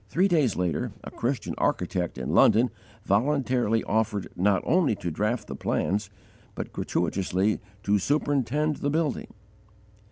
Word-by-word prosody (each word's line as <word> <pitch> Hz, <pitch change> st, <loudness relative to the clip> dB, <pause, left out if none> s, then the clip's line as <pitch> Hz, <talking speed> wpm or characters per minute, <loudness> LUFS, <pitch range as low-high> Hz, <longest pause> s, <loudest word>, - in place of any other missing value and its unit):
Three 185 Hz, -, +3 dB
days 155 Hz, -, +2 dB
later, 90 Hz, -4 st, -1 dB
a -, -, -8 dB
Christian 125 Hz, +2 st, -2 dB
architect 90 Hz, -3 st, -1 dB
in 65 Hz, 0 st, -3 dB
London 120 Hz, +3 st, +5 dB, 0.3 s
voluntarily 120 Hz, 0 st, +1 dB
offered 110 Hz, -2 st, -1 dB
not 95 Hz, +1 st, +2 dB
only 165 Hz, -, +3 dB
to 85 Hz, -3 st, -4 dB
draught 105 Hz, +6 st, -1 dB
the 70 Hz, -, -7 dB
plans, 100 Hz, +8 st, -1 dB, 0.5 s
but -, -, -6 dB
gratuitously 95 Hz, +2 st, 0 dB, 0.2 s
to 105 Hz, 0 st, +2 dB
superintend 145 Hz, +3 st, 0 dB
the 145 Hz, -, -1 dB
building! 155 Hz, -1 st, -1 dB
110 Hz, 130 wpm, -26 LUFS, 95-140 Hz, 0.5 s, London